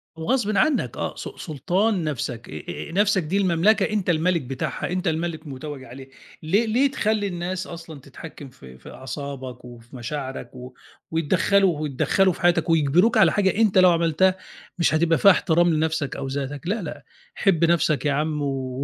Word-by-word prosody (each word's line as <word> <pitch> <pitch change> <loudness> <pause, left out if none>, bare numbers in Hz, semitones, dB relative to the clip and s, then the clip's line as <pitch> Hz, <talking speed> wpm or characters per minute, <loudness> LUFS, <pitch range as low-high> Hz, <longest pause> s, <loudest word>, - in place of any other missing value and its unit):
وغصبٍ 215 +5 0
عنّك 305 +7 +1
آه، - - -3
س - - -6
سلطان 180 - -1
نَفْسك 125 -6 -4
آآ 75 -1 -7 0.3
آآ - - -9
نَفْسك 200 0 +2
دي 175 +6 -1
المملكة 195 +3 +3
أنت 210 -4 -1
المَلِك 170 +1 +2
بتاعها، 130 +6 -4
أنت 180 +1 -2
المَلِك 160 0 -2
متوّج 140 0 -7
عليها 130 +2 -11 0.4
ليه 200 +9 +2
ليه 255 +5 +2
تخلّي 215 -5 0
الناس 180 0 -4
أصلًا 165 -3 -9
تتحكّم 140 +1 -11
في 65 - -15
في - - -13
أعصابك 130 -2 -7
وفي 120 +1 -13
مشاعرك 135 +2 -6
و 125 0 -10 0.4
ويتدخّلوا 175 +2 +2
ويتدخّلوا 155 +6 +1
في - - -12
حياتك 175 -1 +2
ويجبروك 165 - +3
على 185 -7 +6
حاجة 190 +1 +1
أنت 215 -4 +3
لو 185 -1 +7
عملتها 170 +2 +2 0.4
مش 170 - +2
هتبقى 165 +1 +3
فيها 200 - +7
احترام 175 -1 +2
لنَفْسك 155 -2 -1
أو 140 - -5
ذاتك 140 +3 -5
لأ، 210 +4 -1
لأ، 150 -4 -7 0.3
حِب 170 -5 +2
نَفْسك 160 -3 +1
يا 145 - +2
عم 150 +1 -1
و 135 -1 -3
165 Hz, 170 wpm, -23 LUFS, 140-185 Hz, 0.4 s, لو